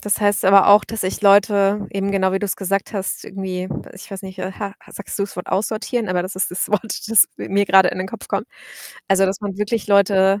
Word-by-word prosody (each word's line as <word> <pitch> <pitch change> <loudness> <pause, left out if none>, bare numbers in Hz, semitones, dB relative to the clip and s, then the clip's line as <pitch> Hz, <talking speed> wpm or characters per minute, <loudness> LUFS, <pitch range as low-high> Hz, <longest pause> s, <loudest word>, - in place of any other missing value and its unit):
das 205 +1 -1
heißt 205 0 +1
aber 195 +1 +6
auch, 205 +1 +7
dass 225 -1 -5
ich 185 +3 -3
Leute 200 0 +3
eben 195 0 -2
genau 190 -1 +1
wie 195 - 0
du's 200 -1 -3
gesagt 195 0 -2
hast, 195 -3 -4
irgendwie 185 -1 -5 0.3
ich 190 - -13
weiß 195 0 -7
nicht, 190 -1 -10
äh, 185 +1 -4
ha 200 0 -6
ha - - -18
sagst 200 - -7
du's 200 0 -4
Wort 180 - -7
„aussortieren“, 220 +3 -2
aber 180 -1 0
das 185 +2 -6
ist 185 - -1
das 180 - -3
Wort, 210 -1 +1 0.3
das 225 -2 +6
mi - - -7
mir 200 +1 +1
grade 190 0 +5
in - - -4
den 185 +1 -4
Kopf - - -9
kommt. - - -2 0.6
Also, 195 0 +3
dass 190 +2 -3
man 200 -2 -5
wirklich 210 +1 -2
Leute, 200 -1 +3
195 Hz, 240 wpm, -20 LUFS, 190-205 Hz, 0.6 s, auch